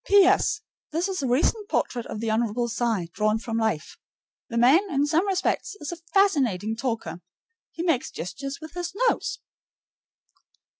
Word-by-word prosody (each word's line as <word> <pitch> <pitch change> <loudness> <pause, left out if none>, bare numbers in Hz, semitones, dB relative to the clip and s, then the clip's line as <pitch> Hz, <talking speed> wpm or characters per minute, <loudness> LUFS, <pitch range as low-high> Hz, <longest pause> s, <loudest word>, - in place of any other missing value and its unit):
P.S. 400 +1 +5 0.3
This 335 +4 0
is 380 -4 -2
a 270 - -1
recent 365 - +1
portrait 240 - -1
of - - -5
the 225 -1 0
Hon. 235 +1 0
Cy 225 -7 -1
drawn 215 +1 +2
from 225 0 -3
life. 220 -9 -1 0.5
The 235 - -3
man, 290 - +5
in 285 0 +2
some 325 +6 +2
respects, 385 +2 0
is 295 - -5
a - - -4 0.2
fascinating 255 - +2
talker; 225 -9 -3 0.5
he 335 - -5
makes 325 -8 +1
gestures 275 +10 -5
with 315 0 -10
his 350 +1 -4
nose. 455 - 0
270 Hz, 155 wpm, -25 LUFS, 225-355 Hz, 0.5 s, P.S